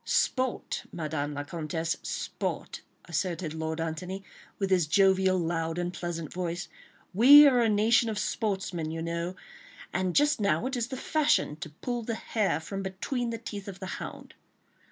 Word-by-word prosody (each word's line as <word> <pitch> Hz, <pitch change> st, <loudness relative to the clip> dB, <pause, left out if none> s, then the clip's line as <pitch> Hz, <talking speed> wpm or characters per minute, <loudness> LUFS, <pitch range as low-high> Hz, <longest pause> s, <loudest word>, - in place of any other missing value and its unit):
"Sport, 255 Hz, -1 st, 0 dB
Madame 150 Hz, -3 st, -3 dB
la 145 Hz, -, -3 dB
Comtesse, 165 Hz, +2 st, -2 dB
sport," -, -, -4 dB, 0.2 s
asserted 170 Hz, -1 st, -2 dB
Lord 160 Hz, 0 st, -3 dB
Antony, 180 Hz, +4 st, -4 dB, 0.3 s
with 195 Hz, -1 st, -1 dB
his 180 Hz, -4 st, +3 dB
jovial, 190 Hz, +1 st, +4 dB
loud 165 Hz, -1 st, -1 dB
and 175 Hz, 0 st, -2 dB
pleasant 170 Hz, -3 st, -5 dB
voice; 175 Hz, -1 st, -3 dB, 0.5 s
"we 280 Hz, +9 st, +10 dB
are 260 Hz, -3 st, +5 dB
a 230 Hz, -2 st, +3 dB
nation 225 Hz, +3 st, +4 dB
of 215 Hz, -, -3 dB
sportsmen, 190 Hz, -7 st, -2 dB
you 165 Hz, 0 st, -4 dB
know, 170 Hz, +2 st, -3 dB, 0.6 s
and 185 Hz, -2 st, 0 dB
just 295 Hz, -4 st, +3 dB
now 200 Hz, 0 st, +2 dB
it 260 Hz, +1 st, -1 dB
is 240 Hz, -1 st, -1 dB
the 260 Hz, -, -5 dB
fashion 300 Hz, -, +2 dB
to 155 Hz, 0 st, -7 dB
pull 240 Hz, -, -4 dB
the 230 Hz, 0 st, -3 dB
hare 210 Hz, -7 st, 0 dB
from 195 Hz, +5 st, -5 dB
between 215 Hz, +6 st, -3 dB
the 230 Hz, -, -3 dB
teeth 205 Hz, -3 st, -7 dB
of 190 Hz, -1 st, -7 dB
the 190 Hz, -, -5 dB, 0.2 s
hound." -, -, -8 dB
185 Hz, 165 wpm, -29 LUFS, 165-220 Hz, 0.6 s, we